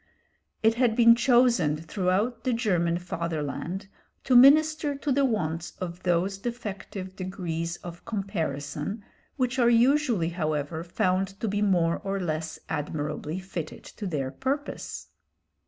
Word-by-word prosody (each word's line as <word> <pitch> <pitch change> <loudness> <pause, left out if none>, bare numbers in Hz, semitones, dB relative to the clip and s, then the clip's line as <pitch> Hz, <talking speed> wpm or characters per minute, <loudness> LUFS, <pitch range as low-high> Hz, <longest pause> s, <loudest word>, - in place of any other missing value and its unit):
It 220 +1 +5
had 235 -3 +3
been 230 -1 +8
chosen 240 - +3
throughout 185 +8 -1
the 255 - +1
German 175 -8 +1
fatherland 170 +2 -4 0.4
to 255 - +2
minister 295 +3 +6
to 280 +1 -2
the 280 +1 +3
wants 170 - -1
of 180 -1 -5
those 185 +2 0
defective 200 -5 -6
degrees 175 -3 -4
of 175 -1 -9
comparison 185 -2 -3 0.3
which 255 -1 0
are 240 -1 +5
usually, 240 - +3
however, 155 -2 -2
found 185 +3 -1
to 225 - -2
be 205 0 -1
more 175 -5 +2
or 195 0 -3
less 160 -3 -3
admirably 150 +1 -3
fitted 185 -4 -6
to 205 - -7
their 140 -6 -2
purpose. 275 - -4
190 Hz, 130 wpm, -27 LUFS, 165-235 Hz, 0.4 s, been